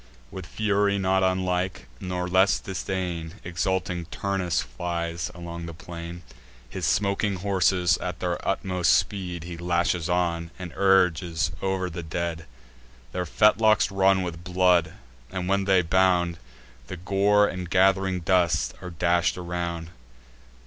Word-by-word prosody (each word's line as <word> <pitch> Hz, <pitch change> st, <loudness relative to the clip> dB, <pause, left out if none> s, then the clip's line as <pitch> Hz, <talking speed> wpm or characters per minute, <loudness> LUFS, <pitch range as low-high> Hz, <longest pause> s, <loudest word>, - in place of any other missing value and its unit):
With 95 Hz, -3 st, -8 dB
fury 100 Hz, -1 st, +1 dB
not 95 Hz, 0 st, +2 dB
unlike, 95 Hz, -4 st, 0 dB
nor 90 Hz, -1 st, -3 dB
less 95 Hz, +2 st, +4 dB
disdain, 90 Hz, -3 st, -4 dB
Exulting 90 Hz, 0 st, -2 dB
Turnus 90 Hz, -5 st, -1 dB
flies 85 Hz, -1 st, -4 dB
along 85 Hz, 0 st, -7 dB
the 85 Hz, -, -8 dB
plain: 85 Hz, +1 st, -8 dB, 0.4 s
His -, -, -3 dB
smoking 100 Hz, 0 st, +1 dB
horses, 90 Hz, -2 st, +2 dB
at 90 Hz, -1 st, -5 dB
their 90 Hz, -1 st, -2 dB
utmost 90 Hz, -3 st, +1 dB
speed, 90 Hz, -4 st, -1 dB
He 85 Hz, 0 st, -7 dB
lashes 85 Hz, -1 st, 0 dB
on, 85 Hz, -2 st, 0 dB
and 90 Hz, -4 st, -7 dB
urges 90 Hz, -4 st, +2 dB
o'er 95 Hz, -1 st, -1 dB
the 85 Hz, 0 st, -6 dB
dead. 80 Hz, 0 st, -4 dB, 0.6 s
Their 90 Hz, -1 st, -3 dB
fetlocks 110 Hz, +2 st, +4 dB
run 95 Hz, -1 st, +3 dB
with 85 Hz, -1 st, -6 dB
blood; 90 Hz, -2 st, +2 dB, 0.4 s
and, 90 Hz, -1 st, -3 dB
when 100 Hz, 0 st, +1 dB
they 95 Hz, -2 st, +4 dB
bound, 90 Hz, -1 st, +2 dB, 0.5 s
The 95 Hz, -, -6 dB
gore 100 Hz, +3 st, +3 dB
and 90 Hz, -2 st, -5 dB
gath'ring 95 Hz, 0 st, +3 dB
dust 90 Hz, 0 st, +2 dB
are 90 Hz, -, -6 dB
dash'd 85 Hz, +1 st, +1 dB
around. 85 Hz, -2 st, -4 dB
90 Hz, 130 wpm, -25 LUFS, 85-95 Hz, 0.6 s, less